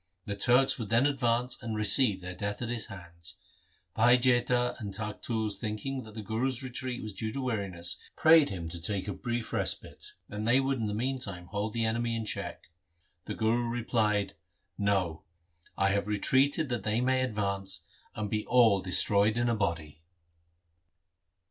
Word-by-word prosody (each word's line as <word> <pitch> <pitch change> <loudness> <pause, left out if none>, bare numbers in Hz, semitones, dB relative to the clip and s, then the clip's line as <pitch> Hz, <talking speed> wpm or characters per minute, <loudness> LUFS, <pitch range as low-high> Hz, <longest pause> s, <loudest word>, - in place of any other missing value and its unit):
The 100 - -3
Turks 125 +6 +4
would 110 -4 -4
then 115 +4 +4
advance 125 -3 0
and 115 -2 -4
receive 105 -1 +3
their 90 0 -6
death 105 +4 -4
at 120 - -3
his 120 -3 -2
hands. 85 -1 -8 0.6
Bhai 120 +3 +5
Jaita 125 0 +2
and 100 -4 -5
Takhtu 110 0 -3
thinking 110 +6 -4
that 110 -3 -12
the 110 - -6
Guru's 120 +5 -1
retreat 130 0 -3
was 110 -1 -6
due 110 +3 -3
to 135 - -5
weariness, 95 -9 -1 0.2
prayed 160 -2 +6
him 85 -4 -5
to 85 0 -7
take 100 +2 -2
a 100 - -2
brief 120 +2 -4
respite, - - -2
and 105 +2 -4
they 125 +3 +5
would 135 -1 0
in 110 - -1
the 105 - -2
meantime 115 -7 -3
hold 105 +1 -2
the 115 -1 0
enemy 115 +1 0
in 115 -1 -3
check. 105 - -3 0.6
The - - -5
Guru 115 +2 +1
replied, 110 -4 0 0.3
' - - -49
No; 85 -5 0 0.6
I 95 - +3
have 100 +1 0
retreated 135 +8 +2
that 120 -2 -1
they 110 +1 0
may 130 +1 +2
advance 100 -5 -2 0.3
and 105 -1 -2
be 105 +1 -2
all 115 -6 +5
destroyed 100 +4 +3
in 120 0 +1
a 115 - +2
body.' 80 -7 -3
110 Hz, 175 wpm, -30 LUFS, 100-120 Hz, 0.6 s, prayed